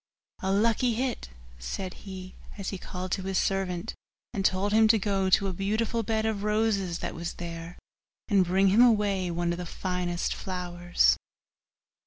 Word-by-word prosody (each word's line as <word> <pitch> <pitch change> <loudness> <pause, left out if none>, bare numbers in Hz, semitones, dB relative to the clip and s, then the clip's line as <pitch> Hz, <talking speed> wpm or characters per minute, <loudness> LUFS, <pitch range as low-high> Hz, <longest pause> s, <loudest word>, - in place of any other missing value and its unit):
'A 190 - 0
lucky 230 +3 +2
hit!' 250 - -2 0.3
said 180 - -4
he, 185 -1 -9 0.2
as 195 -2 -3
he 195 - -5
called 185 0 -6
to 190 - 0
his 190 0 -2
servant, 195 +1 -1 0.4
and 200 -4 -1
told 195 +2 +1
him 220 0 +6
to 220 +1 +5
go 195 -2 0
to 195 - +4
a 190 - -2
beautiful 215 +5 0
bed 220 0 0
of 220 -2 -1
roses 210 -4 +1
that - - -4
was 170 +1 -5
there, 170 0 -7 0.5
and 200 -4 +4
bring 190 +2 +3
him 210 +5 +5
away 205 -6 +3
one 170 0 0
of 170 - -3
the 180 - -4
finest 180 -1 -2
flowers. 175 - +1
190 Hz, 170 wpm, -28 LUFS, 180-210 Hz, 0.5 s, him